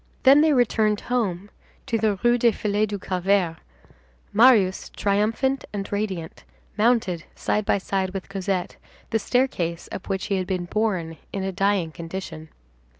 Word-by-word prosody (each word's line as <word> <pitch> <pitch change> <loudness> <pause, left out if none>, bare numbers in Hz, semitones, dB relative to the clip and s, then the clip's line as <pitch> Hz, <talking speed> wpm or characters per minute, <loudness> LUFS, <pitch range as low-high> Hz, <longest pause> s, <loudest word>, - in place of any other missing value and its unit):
Then 275 +2 +7
they 315 0 +4
returned 220 -5 +2
home 205 -6 -2 0.3
to 230 -4 0
the 215 -1 +2
Rue 240 0 +4
des 235 0 +5
Filles 210 +1 0
du 205 0 -4
Calvaire. 185 -2 0 0.8
Marius, 210 -4 +4
triumphant 220 +7 0
and 200 -1 -5
radiant, 195 -6 -3 0.3
mounted 215 -7 +1
side 210 0 -1
by - - +3
side 190 -1 -1
with 190 0 -6
Cosette 195 -2 -3 0.3
the 225 - +2
staircase 185 -10 -1
up 190 - -7
which 190 -1 -1
he 200 - 0
had 185 -1 -2
been 185 -2 -2
borne 180 -5 -1
in 195 - -3
a 190 - -2
dying 195 -3 +1
condition. 165 -1 -7
200 Hz, 150 wpm, -24 LUFS, 185-220 Hz, 0.8 s, Then